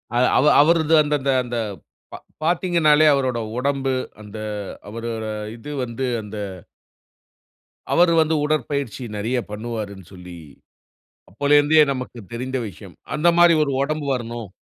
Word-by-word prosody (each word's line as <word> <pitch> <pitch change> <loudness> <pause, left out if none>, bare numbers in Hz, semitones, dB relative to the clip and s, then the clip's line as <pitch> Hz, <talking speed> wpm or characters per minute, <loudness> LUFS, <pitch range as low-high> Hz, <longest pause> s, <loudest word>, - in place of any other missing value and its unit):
அது 125 - +4
அவ 140 - +3 0.2
அவருது 160 0 +3
அந்த 150 0 -1
அந்த 135 0 +1
அந்த 120 0 -5 0.6
பா - - -6 0.3
பாத்தீங்கனாலே, 165 -3 +3
அவரோட 130 -3 0 0.2
உடம்பு 135 0 0 0.3
அந்த 105 +1 -10 0.5
அவரோட 115 0 -5 0.3
இது 145 +6 -9
வந்து, 125 +2 -4 0.2
அந்த 105 0 -9 1.6
அவரு 170 0 +5
வந்து 160 0 +2
உடற்பயிற்சி 140 -4 -2
நெறையப் 120 +3 -2
பண்ணுவாருனு 105 -4 -6
சொல்லி, 90 -1 -11 0.9
அப்போலருந்தே 145 +6 +4
நமக்குத் 125 -6 -8
தெரிந்த 130 +2 -3
விஷயம். 95 - -13 0.2
அந்தமாரி 170 +1 +5
ஒரு 140 - -2
ஒடம்பு 150 0 -2
வரணும். 115 -3 -5
130 Hz, 120 wpm, -22 LUFS, 115-150 Hz, 1.6 s, அவரு